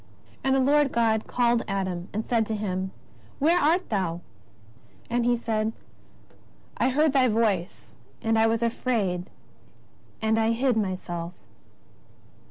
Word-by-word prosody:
And 265 0 +2
the - - +3
Lord 285 +1 +3
God 225 -2 +1
called 240 -1 +2
Adam, 185 -3 -3
and 215 +2 -3
said 230 -3 +1
to 220 - -2
him: 190 -2 -2 0.5
Where 330 +5 +3
art 340 +4 +2
thou? 180 -5 -1 0.9
And 240 0 +1
he 245 0 +3
said: 220 -1 -1 1.0
I 250 - +2
heard 295 +2 +2
Thy 260 -2 +4
voice, 215 -6 -1 0.3
and 225 -1 +1
I 225 - +5
was 225 +1 0
afraid, 210 -7 -1 0.9
and 220 0 +1
I 225 +1 +2
hid 250 +1 +1
myself. 185 -4 -3
225 Hz, 135 wpm, -26 LUFS, 195-245 Hz, 1.0 s, I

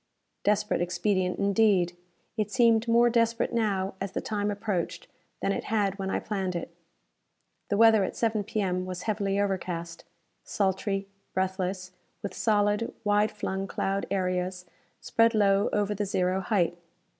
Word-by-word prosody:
Desperate 210 -2 +1
expedient, 180 +1 0
indeed! 200 -3 +3 0.4
It 215 -2 -1
seemed 230 -1 +3
more 235 +1 +5
desperate 230 0 +1
now 200 -4 0
as 195 -1 -3
the - - -1
time 205 -1 -2
approached 205 -4 -2 0.4
than - - +1
it - - -3
had 205 -2 0
when 190 0 -2
I - - 0
planned 190 -4 -3
it. 170 0 -5 0.9
The 205 - +1
weather 220 -2 +6
at - - -3
7 220 -2 0
P.M. 185 -3 -1
was 180 -1 -5
heavily 200 -2 0
overcast. 175 -4 -3 0.4
Sultry, 195 0 -1 0.3
breathless, 185 0 -2 0.3
with 200 -2 -4
solid, 210 +1 +1
wide 210 0 +3
flung 195 -2 -3
cloud 195 +1 -2
areas 180 -1 -1 0.4
spread 230 0 +3
low 200 -1 +3
over 210 0 +1
the 205 0 -2
zero 185 -1 +1
height. 190 -4 +1
200 Hz, 145 wpm, -28 LUFS, 185-215 Hz, 0.9 s, weather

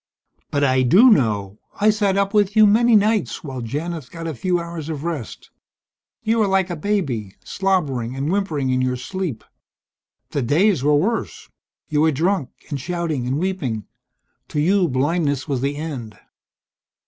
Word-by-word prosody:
"But 145 - 0
I 130 -1 +3
do 195 - +6
know. 105 - +1 0.2
I 210 +1 +5
sat 205 -2 +1
up 200 +1 +1
with 205 -1 +2
you 215 -1 +7
many 230 +3 +5
nights, 210 -2 +1
while 130 -4 -6
Janith 150 +4 -4
got 165 +2 -8
a 160 - -3
few 175 +7 0
hours 170 -2 -6
of 150 -2 -4
rest. 160 -9 -5 0.7
You 225 +1 +1
were 215 - +3
like 190 -1 +1
a - - -2
baby, 145 - -2
slobbering 140 -11 -1
and 140 +4 -2
whimpering 160 -10 0
in 130 0 +1
your 130 0 0
sleep. 140 - -4 0.9
The 140 - -1
days 160 - +2
were 150 +1 +4
worse. 210 +10 -1 0.4
You 150 -1 +1
were 160 0 +4
drunk 160 -1 0 0.2
and 140 -3 -3
shouting 160 -5 -2
and 130 +2 0
weeping. 150 - -2 0.6
To 150 - -3
you 185 +4 +3
blindness 145 +1 0
was 135 -4 -1
the 140 +1 -1
end." 135 - -6
160 Hz, 165 wpm, -21 LUFS, 130-190 Hz, 0.9 s, you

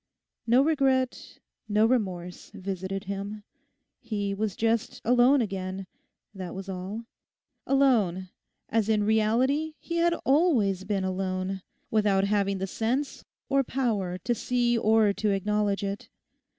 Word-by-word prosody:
No 245 +4 +5
regret, 270 -4 0 0.3
no 210 +1 +4
remorse 185 -7 -1
visited 190 0 -4
him. 200 +2 -5 0.6
He 205 -4 -3
was 205 -1 -2
just 225 0 0
alone 250 +3 +5
again, 190 -2 -4 0.5
that 185 -3 -7
was 190 0 -7
all—alone, 205 +1 -1 0.4
as 225 -1 0
in 215 -1 +3
reality 245 +9 +2
he 340 - -4
had 340 0 +3
always 250 - +3
been 200 -2 -1
alone, 185 0 -2 0.3
without 205 -3 +3
having 200 -1 +1
the 190 - -2
sense 240 +8 -2 0.2
or 275 0 +2
power 215 -9 -1
to 240 +6 -1
see 240 +1 +1
or 220 -2 +3
to 210 +2 -1
acknowledge 205 +1 0
it. 200 +1 -4
210 Hz, 125 wpm, -27 LUFS, 195-245 Hz, 0.6 s, No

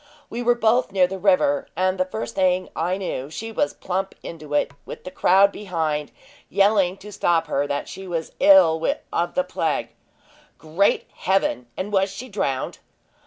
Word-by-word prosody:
We 235 - -3
were 240 0 +3
both 235 0 +2
near 190 -2 +4
the 190 +1 -5
river, 240 +10 +2
and 185 +2 0
the 185 - +2
first 120 -10 -5
thing 185 -1 +1
I 175 +3 0
knew, 145 -8 -4
she 225 +8 -6
was 290 +6 -1
plump 190 +1 -3
into 155 -3 -6
it, 145 - +1
with - - -9
the 185 - -7
crowd 195 +2 +4
behind, 160 -8 -2 0.4
yelling 195 -2 +3
to 210 +2 -11
stop 170 -4 +1
her, 145 -2 -1
that 145 0 -3
she 190 0 -8
was 165 -2 -3
ill 280 - +6 0.3
of 175 +1 -1
the 275 - +2
plague." - - -2 0.7
"Great 165 +6 +1
Heaven! 190 -10 0
and 205 +3 -4
was 195 0 +3
she 225 +7 -8
drowned?" 140 - -2
185 Hz, 170 wpm, -23 LUFS, 165-205 Hz, 0.7 s, ill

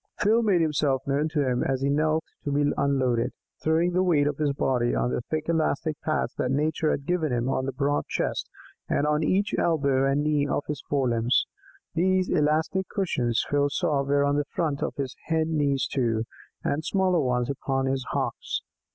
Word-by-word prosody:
Phil 220 +3 +3
made 200 -6 +3
himself 145 -4 +1
known 140 +2 +1
to 150 -4 0
him 125 -1 +1
as 135 0 -1
he 140 - +2
knelt 155 +2 +1 0.2
to 145 - -2
be 145 0 +2
unloaded, 130 -3 +1 0.3
throwing 165 +3 +2
the 180 - +2
weight 165 -6 +3
of 145 -1 -1
his 150 -2 +2
body 125 -3 0
on 125 - 0
the - - -1
thick 155 0 -2
elastic 160 -1 0
pads 155 - -1
that 125 - 0
Nature 150 +3 +1
had 140 - -1
given 165 -4 0
him 120 0 0
on 130 0 -1
his 135 - -4
broad 145 0 0
chest - - -2 0.4
and 145 - +1
on 150 +1 +1
each 195 +5 +1
elbow 140 -5 +2
and 140 +2 +1
knee 150 -1 +1
of 145 - -1
his 150 -3 -4
fore 135 -3 +1
limbs. 115 +1 +2 0.5
These 185 +2 +2
elastic 160 +4 +1
cushions, 125 - 0
Phil 145 0 +2
saw, 140 0 0
were 140 +1 +2
on 140 0 +1
the 145 - 0
front 150 -2 -2
of - - -2
his 135 -2 -4
hind 160 0 +1
knees 140 -3 +1
too, 115 -4 0 0.4
and 150 +2 -1
smaller 185 0 +2
ones 125 -2 0
upon 135 -1 -1
his 135 0 -1
hocks. - - -2
145 Hz, 195 wpm, -26 LUFS, 135-160 Hz, 0.5 s, Phil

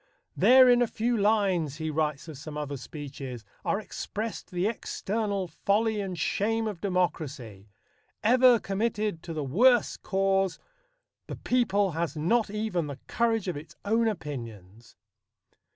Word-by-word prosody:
"There 255 0 +7
in 245 0 +5
a 245 - +3
few 235 +2 -1
lines," 200 -8 +2
he 160 0 -3
writes 150 -1 -1
of 160 - -8
some 150 +2 -8
other 145 -1 -3
speeches, 135 -4 -8 0.2
"are 200 - 0
expressed 215 +1 -5
the 180 0 -1
external 205 -2 -2
folly 210 +6 0
and 190 -3 -4
shame 225 +7 0
of 205 -6 -5
democracy. 140 - -2 0.5
Ever 250 +2 +6
committed 210 -3 -2
to 170 - -8
the 155 -2 -3
worse 235 - +3
cause, 195 -2 0 0.7
the - - -5
people 205 -6 +1
has 165 -2 -3
not 215 +9 +2
even 205 -6 -2
the 140 -2 -6
courage 225 -3 0
of 180 - -2
its 150 +2 -9
own 225 +2 +2
opinions." 115 - -7
195 Hz, 140 wpm, -28 LUFS, 150-220 Hz, 0.7 s, There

